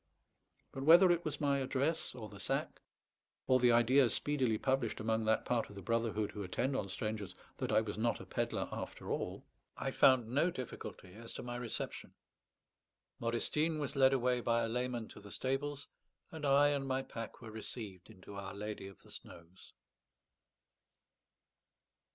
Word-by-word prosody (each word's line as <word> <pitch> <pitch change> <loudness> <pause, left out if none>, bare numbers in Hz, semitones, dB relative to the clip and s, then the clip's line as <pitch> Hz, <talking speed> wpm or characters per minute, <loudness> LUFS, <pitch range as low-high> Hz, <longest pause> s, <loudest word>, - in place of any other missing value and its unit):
But 135 - -6
whether 170 +5 +8
it 175 0 +1
was - - -3
my 140 -2 +2
address, 135 +3 0
or 110 -4 -6
the - - -12
sack, - - -2 0.6
or 130 0 +4
the 125 -1 +5
idea 120 +2 +5
speedily 130 -2 +1
published 130 -2 0
among 110 0 0
that 110 0 +2
part 120 -2 0
of 100 - -11
the 100 - -7
brotherhood 115 0 0
who 105 - -6
attend 125 +8 -1
on 100 -6 -2
strangers 105 -2 -4 0.2
that - - -2
I - - +5
was 105 -1 -5
not 115 +1 +1
a - - -9
pedlar - - -1
after - - -5
all, - - -3 0.3
I - - -2
found 130 -4 +5
no 140 +9 +2
difficulty 120 - -7
as 115 +2 -10
to - - -6
my 120 0 -5
reception. 120 -2 -5 1.0
Modestine 150 +7 0
was 145 -3 -3
led 135 -1 +6
away 125 -2 +2
by 115 0 +2
a - - 0
layman 120 -1 -2
to - - -11
the 100 - -12
stables, 140 +4 -2 0.4
and 155 -3 -3
I 140 +1 +6
and 140 -2 -1
my 130 0 0
pack 115 -3 -7
were 115 -3 -9
received 105 -4 -7
into 100 -1 -12
Our 100 -1 -6
Lady 105 -1 -5
of 95 - -14
the - - -16
Snows. 85 +3 -12
120 Hz, 170 wpm, -35 LUFS, 110-135 Hz, 1.0 s, whether